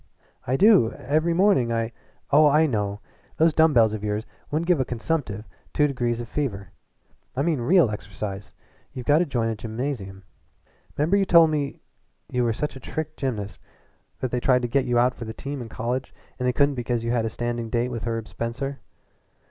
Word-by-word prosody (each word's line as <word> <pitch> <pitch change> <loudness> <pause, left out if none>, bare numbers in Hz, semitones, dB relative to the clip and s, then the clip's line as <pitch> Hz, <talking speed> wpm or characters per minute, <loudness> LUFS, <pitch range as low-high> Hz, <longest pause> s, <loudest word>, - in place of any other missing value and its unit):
"I 130 +2 +1
do. 195 - +5
Every 155 +5 0
morning 180 - +3
I 115 0 -1 0.2
" - - -37
"Oh, 150 +1 +7
I 150 +2 +5
know! 105 -6 -2 0.3
But - - -32
those 165 - +3
dumb 160 +1 +5
bells 115 -5 +4
of 105 -1 -5
yours 105 +1 -2 0.2
wouldn't 155 +3 -1
give 175 -3 +3
a - - +3
consumptive 120 -4 -3 0.3
two 150 - +4
degrees 120 -4 -1
of 120 - -5
fever. 100 -9 -3 0.6
I 135 - 0
mean 155 -5 0
real 165 - +4
exercise. 100 0 -6 0.4
You've 125 - -7
got 145 +2 +4
to 175 - +1
join 120 -5 0
a 115 - -2
gymnasium. 110 -3 -5 0.7
'Member 160 +7 +3
you 195 - +2
told 165 -3 +6
me 145 -2 -2 0.5
you 125 -1 +1
were 120 - +2
such 150 +6 -3
a - - -8
trick 155 +4 -5
gymnast 110 -7 -4
once - - -35
that 130 - -2
they 125 - 0
tried 125 0 +3
to - - +1
get 130 +3 +1
you 120 -1 +1
out 125 +1 +4
for 120 - -8
the 110 - -6
team 140 -1 -5
in 115 - -7
college 125 +4 -3 0.3
and 125 - 0
they - - +4
couldn't 140 +1 +3
because 120 -2 -2
you 115 - -1
had 120 -2 +1
a - - 0
standing 120 0 -3
date 120 +2 0
with 115 -3 -5
Herb 115 -1 -3
Spencer?" 135 +4 -4
125 Hz, 210 wpm, -24 LUFS, 115-145 Hz, 0.7 s, Oh